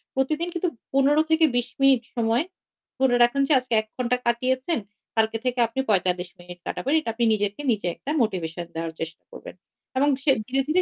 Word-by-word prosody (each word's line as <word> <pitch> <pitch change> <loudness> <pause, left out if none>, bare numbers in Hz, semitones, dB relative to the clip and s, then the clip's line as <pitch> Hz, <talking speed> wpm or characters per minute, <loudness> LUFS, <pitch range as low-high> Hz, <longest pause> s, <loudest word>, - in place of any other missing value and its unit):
প্রতিদিন 305 +6 0
কিন্তু, 350 +1 0 0.2
১৫ 280 +3 +4
থেকে 320 0 +5
২০ 245 0 +1
মিনিট 270 -3 +5
সময় 230 +3 +2 0.6
ধরে 260 -2 +3
রাখেন 240 +4 +2
যে 300 - +3
আজকে 255 -1 -5
১ 215 - -19
ঘন্টা 250 0 +1
কাটিয়েছেন, 255 +5 +1 0.4
কালকে 225 0 +2
থেকে 250 0 0
আপনি 230 +4 -5
৪৫ 180 -2 +1
মিনিট 175 0 -11
কাটাবেন। 275 - -2
এটা 310 - -5
আপনি 235 +1 +1
নিজকে 205 +2 -1
নিজে 210 -5 -1
একটা 285 - -5
মোটিভেশন 175 -6 -2
দেওয়ার 165 0 -3
চেষ্টা 165 +1 -6
করবেন। - - -10 0.4
এবং 280 +2 +3
ধীয়ে 280 0 +3
ধীরে, 265 +3 0
ধীরে 335 +4 +3
245 Hz, 185 wpm, -24 LUFS, 210-275 Hz, 0.6 s, থেকে